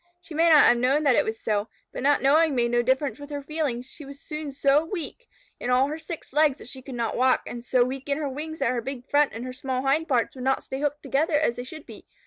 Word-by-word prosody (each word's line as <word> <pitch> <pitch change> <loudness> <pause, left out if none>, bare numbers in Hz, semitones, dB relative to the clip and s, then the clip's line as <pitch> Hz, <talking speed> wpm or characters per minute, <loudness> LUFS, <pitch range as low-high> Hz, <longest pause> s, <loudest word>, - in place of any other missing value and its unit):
She 335 -2 -12
may 330 +2 +3
not 310 -2 +8
have 240 - +5
known 265 +5 +2
that 275 -4 +4
it - - +4
was 220 0 -4
so, 210 0 -1 0.3
but - - -5
not 285 +1 +2
knowing 300 +2 +4
made 235 -1 +1
no 240 0 +3
difference 265 +4 0
with 285 0 -9
her 285 -1 -5
feelings. 285 -5 -2
She 290 +3 -12
was 280 0 -11
soon 305 -1 -6
so 280 +2 +3
weak 380 +8 -6 0.3
in 245 - -3
all 255 +2 +3
her 310 +2 -5
six 320 -4 -8
legs 300 -2 +3
that - - -12
she 260 +1 -8
could 260 -1 -8
not 235 -1 -2
walk, 255 +1 +3
and 240 -1 -7
so 245 0 +3
weak 265 +3 -5
in 280 - +1
her 305 -2 -2
wings 305 +4 -5
that 270 -4 +1
her 245 -2 -1
big 260 +1 -7
front 290 0 +4
and 230 +2 -6
her 255 - -6
small 260 0 -3
hind 295 +4 +1
pairs 245 -4 +1
would 255 - -8
not 265 +1 +1
stay 265 +1 -5
hooked 290 0 -2
together 295 +3 +1
as 295 -5 +1
they 245 - -4
should 310 +4 -10
be. - - -13
275 Hz, 280 wpm, -25 LUFS, 255-300 Hz, 0.3 s, not